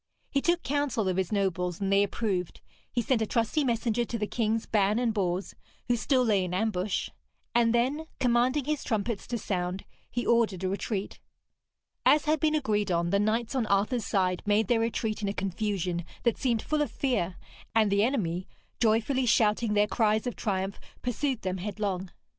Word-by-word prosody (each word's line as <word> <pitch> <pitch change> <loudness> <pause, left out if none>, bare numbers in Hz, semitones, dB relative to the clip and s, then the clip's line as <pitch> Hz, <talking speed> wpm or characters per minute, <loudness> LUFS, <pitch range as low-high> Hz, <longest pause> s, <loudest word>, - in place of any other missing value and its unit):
He 275 - +1
took 345 +2 +1
counsel 275 -7 0
of 185 -1 0
his 190 0 -1
nobles, 180 -4 0
and 195 -1 0
they 200 - +5
approved; 200 -3 -2 0.3
he 240 - 0
sent 240 -1 +1
a 220 - 0
trusty 230 +8 +1
messenger 235 -2 +1
to 235 0 -4
the 210 - -1
Kings 225 0 -1
Ban 210 0 +2
and 240 -2 +1
Bors, 185 -2 -1 0.3
who 245 - +3
still 255 +2 +2
lay 205 -4 +3
in 180 0 -3
ambush; 200 -1 -1 0.4
and 235 -1 +4
then, 265 +7 +1
commanding 250 +3 +2
his 300 -1 -1
trumpets 220 -1 -2
to 240 - -2
sound, 185 -3 -3 0.2
he 240 - -2
ordered 220 -6 +2
a 185 - +1
retreat. 200 +1 -3 0.8
As 300 0 +5
had 310 0 +2
been 310 +1 +2
agreed 210 -8 0
on, 170 -1 +1
the 200 - +3
knights 220 +3 0
on 250 -5 0
Arthur's 210 +4 +1
side 185 -2 +1
made 210 +1 +2
their 240 -2 +3
retreat 225 -1 -1
in 205 - -1
a - - -2
confusion 185 -3 -2 0.2
that 235 -3 +3
seemed 235 -4 +1
full 305 0 0
of 295 - 0
fear; 190 -10 -1 0.4
and 215 -3 +4
the 200 +1 +3
enemy, 185 -8 -1 0.3
joyfully 235 +3 +2
shouting 215 -1 +3
their 205 0 +5
cries 215 0 +1
of 245 - -3
triumph, 195 -1 -2 0.2
pursued 250 0 -1
them 185 0 -1
headlong. 195 -2 -3
215 Hz, 185 wpm, -28 LUFS, 195-240 Hz, 0.8 s, they